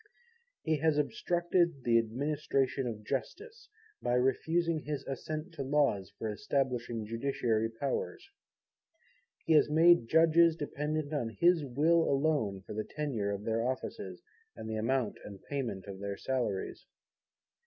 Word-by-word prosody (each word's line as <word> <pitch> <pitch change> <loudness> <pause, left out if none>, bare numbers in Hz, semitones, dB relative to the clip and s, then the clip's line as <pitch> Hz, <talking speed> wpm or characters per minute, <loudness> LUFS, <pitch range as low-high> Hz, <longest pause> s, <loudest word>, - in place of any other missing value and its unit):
He 160 -1 +1
has 155 0 +2
obstructed 170 +3 +1
the 115 -1 +4
Administration 135 +2 -1
of 110 -3 -5
Justice, 430 - -5 0.3
by 120 - +1
refusing 160 +6 +1
his 150 -1 -5
Assent 155 +5 -5
to 165 - -6
Laws 135 -9 +1
for 110 - -3
establishing 120 -2 -1
Judiciary 115 -1 0
Powers. 140 - -3 1.2
He 165 - +3
has 150 - +5
made 165 -4 +5
judges 165 +2 +5
dependent 150 0 -3
on 120 -6 -1
his 175 -2 +4
Will 155 +6 +3
alone, 140 -9 +1
for - - -7
the 110 +1 -2
tenure 130 -10 -3
of 100 0 -3
their 115 +1 0
offices, 130 +1 -4 0.3
and - - -8
the 110 - -3
amount 120 +1 0
and 100 -2 -9
payment 125 -9 -4
of 100 -2 -8
their 100 0 -4
salaries. 120 -7 -3
135 Hz, 135 wpm, -31 LUFS, 115-155 Hz, 1.2 s, has